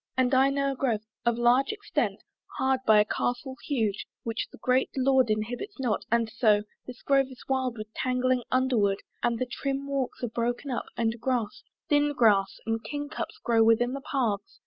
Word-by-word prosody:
And 260 Hz, 0 st, +2 dB
I 265 Hz, +1 st, +5 dB
know 275 Hz, 0 st, 0 dB
a -, -, -4 dB
grove 240 Hz, -5 st, 0 dB, 0.3 s
Of 235 Hz, -1 st, +3 dB
large 245 Hz, +3 st, +3 dB
extent, 415 Hz, -1 st, -2 dB, 0.3 s
hard 265 Hz, 0 st, +2 dB
by 215 Hz, -1 st, +7 dB
a 210 Hz, -, +4 dB
castle 245 Hz, +4 st, -2 dB
huge 220 Hz, -8 st, -1 dB, 0.2 s
Which 225 Hz, -1 st, -3 dB
the -, -, -13 dB
great 255 Hz, +1 st, +1 dB
lord 260 Hz, -2 st, +3 dB
inhabits 235 Hz, -, -3 dB
not: 240 Hz, -6 st, -1 dB
and 230 Hz, -1 st, +3 dB
so 215 Hz, -2 st, +3 dB, 0.2 s
This 250 Hz, -1 st, -10 dB
grove 275 Hz, -1 st, +3 dB
is 260 Hz, -, -12 dB
wild 260 Hz, -3 st, -1 dB
with 215 Hz, 0 st, -8 dB
tangling 255 Hz, 0 st, +1 dB
underwood, 240 Hz, -7 st, +2 dB, 0.2 s
And 235 Hz, -1 st, +1 dB
the 255 Hz, -, -1 dB
trim 275 Hz, +2 st, -3 dB
walks 275 Hz, -3 st, -3 dB
are -, -, +1 dB
broken 240 Hz, +4 st, -2 dB
up, 245 Hz, -, -2 dB
and 230 Hz, 0 st, -1 dB
grass, 240 Hz, -4 st, -1 dB, 0.3 s
Thin 290 Hz, -1 st, +3 dB
grass 205 Hz, -7 st, +3 dB
and 225 Hz, 0 st, -1 dB
king 290 Hz, 0 st, -5 dB
cups -, -, -5 dB
grow 230 Hz, -2 st, +4 dB
within 230 Hz, +2 st, +3 dB
the 275 Hz, -, -4 dB
paths. 235 Hz, -8 st, -2 dB
250 Hz, 190 wpm, -27 LUFS, 225-270 Hz, 0.3 s, by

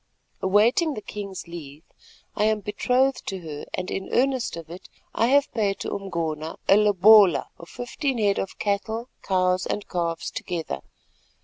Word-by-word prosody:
Awaiting 225 Hz, -, +3 dB
the 215 Hz, -, -5 dB
king's 200 Hz, -3 st, -7 dB
leave 155 Hz, -3 st, -9 dB, 0.5 s
I 210 Hz, -, +2 dB
am 215 Hz, -1 st, +1 dB
betrothed 250 Hz, +6 st, +1 dB
to 190 Hz, -2 st, -4 dB
her 150 Hz, -3 st, -7 dB
and 185 Hz, -, -4 dB
in 190 Hz, -, -4 dB
earnest 260 Hz, -7 st, +1 dB
of 165 Hz, -1 st, -8 dB
it 180 Hz, -, -10 dB, 0.2 s
I 230 Hz, -, +2 dB
have 280 Hz, +2 st, +3 dB
paid 205 Hz, -4 st, 0 dB
to -, -, -3 dB
Umgona 165 Hz, -5 st, -3 dB
a 195 Hz, -, +7 dB
lobola 205 Hz, -3 st, +6 dB
of 170 Hz, -, -12 dB
fifteen 260 Hz, +2 st, -3 dB
head 205 Hz, -3 st, +2 dB
of 195 Hz, -, -4 dB
cattle, 220 Hz, +4 st, -2 dB
cows 185 Hz, -1 st, +1 dB
and 205 Hz, -, -3 dB
calves 170 Hz, -2 st, -2 dB
together. 160 Hz, -, -4 dB
200 Hz, 155 wpm, -25 LUFS, 175-220 Hz, 0.5 s, a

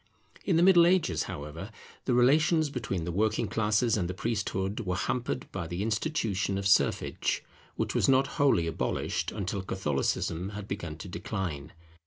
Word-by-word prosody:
In 180 Hz, -5 st, +2 dB
the 170 Hz, -, +4 dB
Middle 175 Hz, -2 st, +7 dB
Ages, 180 Hz, -1 st, +2 dB
however, 75 Hz, +7 st, -6 dB, 0.4 s
the 125 Hz, -, +2 dB
relations 155 Hz, +5 st, +4 dB
between 105 Hz, -9 st, -3 dB
the 85 Hz, -, -3 dB
working 110 Hz, +4 st, +1 dB
classes 110 Hz, +1 st, +1 dB
and 90 Hz, -5 st, -1 dB
the 90 Hz, -, -4 dB
priesthood 105 Hz, -2 st, -2 dB
were 90 Hz, -5 st, -2 dB
hampered 125 Hz, +6 st, -2 dB
by 90 Hz, -4 st, -4 dB
the 90 Hz, +4 st, -3 dB
institution 105 Hz, -, -1 dB
of 100 Hz, -, -3 dB
serfage, 100 Hz, -, +1 dB, 0.3 s
which -, -, -2 dB
was -, -, +2 dB
not 135 Hz, 0 st, +5 dB, 0.2 s
wholly 135 Hz, -12 st, +4 dB
abolished 80 Hz, -1 st, -2 dB
until 100 Hz, -1 st, -3 dB
Catholicism 85 Hz, 0 st, -1 dB
had 105 Hz, -1 st, -7 dB
begun 85 Hz, -7 st, -5 dB
to 90 Hz, -, -8 dB
decline. 85 Hz, -5 st, -4 dB
100 Hz, 160 wpm, -29 LUFS, 90-125 Hz, 0.4 s, Middle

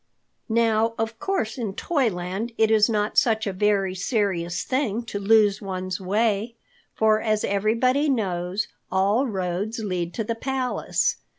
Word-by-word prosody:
Now, 225 Hz, 0 st, +2 dB
of 225 Hz, 0 st, -3 dB
course 265 Hz, -, -2 dB
in 210 Hz, -5 st, -3 dB
Toyland 220 Hz, -, -1 dB
it 220 Hz, 0 st, +3 dB
is 215 Hz, 0 st, +5 dB
not 210 Hz, -1 st, +2 dB
such 220 Hz, -2 st, +1 dB
a 200 Hz, -, -2 dB
very 195 Hz, -1 st, +1 dB
serious 185 Hz, -3 st, -1 dB
thing 245 Hz, -4 st, -1 dB
to 215 Hz, -3 st, -5 dB
lose 205 Hz, 0 st, +4 dB
one's 185 Hz, -1 st, -4 dB
way, 215 Hz, +3 st, 0 dB, 0.4 s
for 220 Hz, 0 st, +3 dB
as 215 Hz, -2 st, 0 dB
everybody 235 Hz, +8 st, +1 dB
knows, 190 Hz, -4 st, -1 dB, 0.2 s
all 205 Hz, +8 st, +2 dB
roads 190 Hz, +1 st, -2 dB
lead 180 Hz, -6 st, -3 dB
to 225 Hz, -, -1 dB
the 230 Hz, -, -2 dB
palace. 255 Hz, +2 st, -1 dB
215 Hz, 140 wpm, -24 LUFS, 195-230 Hz, 0.4 s, is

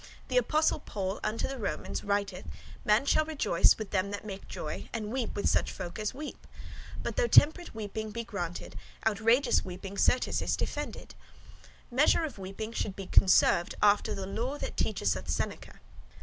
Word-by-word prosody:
The -, -, +1 dB
Apostle 315 Hz, -10 st, +3 dB
Paul 195 Hz, -7 st, -4 dB
unto 215 Hz, +2 st, -1 dB
the 270 Hz, -1 st, -5 dB
Romans 200 Hz, -, -3 dB
writeth, 200 Hz, -2 st, -1 dB, 0.4 s
'Man 215 Hz, +5 st, +3 dB
shall 310 Hz, -, +4 dB
rejoice 305 Hz, -, +3 dB
with 215 Hz, -3 st, -6 dB
them 195 Hz, 0 st, +1 dB
that 205 Hz, +1 st, -5 dB
make 195 Hz, -2 st, -7 dB
joy, 150 Hz, -, -6 dB
and 215 Hz, -2 st, -4 dB
weep 250 Hz, -2 st, -2 dB
with 205 Hz, -, 0 dB
such -, -, +2 dB
folk 180 Hz, +2 st, -6 dB
as 215 Hz, -1 st, -1 dB
weep.' 295 Hz, +3 st, -8 dB, 0.6 s
But -, -, -4 dB
though -, -, +3 dB
temperate 330 Hz, -, +5 dB
weeping 215 Hz, 0 st, -4 dB
be 230 Hz, +2 st, -4 dB
granted, 180 Hz, -7 st, -5 dB, 0.3 s
outrageous 225 Hz, +5 st, +3 dB
weeping 190 Hz, +2 st, -7 dB
certes 255 Hz, -, +2 dB
is -, -, 0 dB
defended. -, -, -4 dB, 0.8 s
Measure 290 Hz, +6 st, +4 dB
of 295 Hz, -10 st, -5 dB
weeping 195 Hz, +4 st, -5 dB
should 200 Hz, -4 st, -2 dB
be 195 Hz, -, -6 dB
conserved, 180 Hz, -2 st, +4 dB
after 210 Hz, +1 st, +3 dB
the 195 Hz, -1 st, -4 dB
lore 240 Hz, +8 st, -3 dB
[doctrine] -, -, -3 dB
that -, -, -18 dB
teacheth -, -, +1 dB
us -, -, -5 dB
Seneca. -, -, -4 dB
215 Hz, 175 wpm, -30 LUFS, 195-255 Hz, 0.8 s, temperate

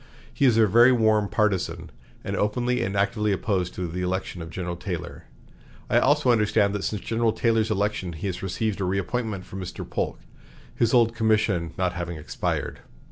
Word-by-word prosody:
He 140 Hz, -, +1 dB
is 120 Hz, -4 st, +4 dB
a 110 Hz, -, +6 dB
very 120 Hz, +5 st, +6 dB
warm 110 Hz, -4 st, +3 dB
partizan, 105 Hz, -4 st, -1 dB, 0.3 s
and -, -, -3 dB
openly 120 Hz, +4 st, 0 dB
and 95 Hz, +1 st, -2 dB
actively 105 Hz, +1 st, +1 dB
opposed 95 Hz, -2 st, -1 dB
to 90 Hz, -1 st, -3 dB
the 90 Hz, +2 st, -4 dB
election 90 Hz, -1 st, -3 dB
of 80 Hz, -, -7 dB
General 90 Hz, 0 st, -4 dB
Taylor. -, -, -6 dB, 0.7 s
I -, -, +5 dB
also 145 Hz, -2 st, +3 dB
understand 105 Hz, -3 st, +2 dB
that 100 Hz, -1 st, -3 dB
since 105 Hz, -3 st, -3 dB
General 115 Hz, 0 st, +1 dB
Taylor's 115 Hz, -1 st, +1 dB
election 105 Hz, -4 st, -1 dB
he 80 Hz, +6 st, -7 dB
has 95 Hz, -3 st, -3 dB
received 100 Hz, +2 st, -2 dB
a -, -, +1 dB
reappointment 100 Hz, +2 st, -2 dB
from 95 Hz, -, -7 dB
Mr. 90 Hz, -, -7 dB
Polk, -, -, -3 dB, 0.6 s
his 115 Hz, -1 st, +2 dB
old 115 Hz, -2 st, +4 dB
commission 110 Hz, -7 st, +1 dB
not 90 Hz, -1 st, 0 dB
having 85 Hz, -1 st, -4 dB
expired. 75 Hz, -, -3 dB
105 Hz, 180 wpm, -25 LUFS, 90-115 Hz, 0.7 s, a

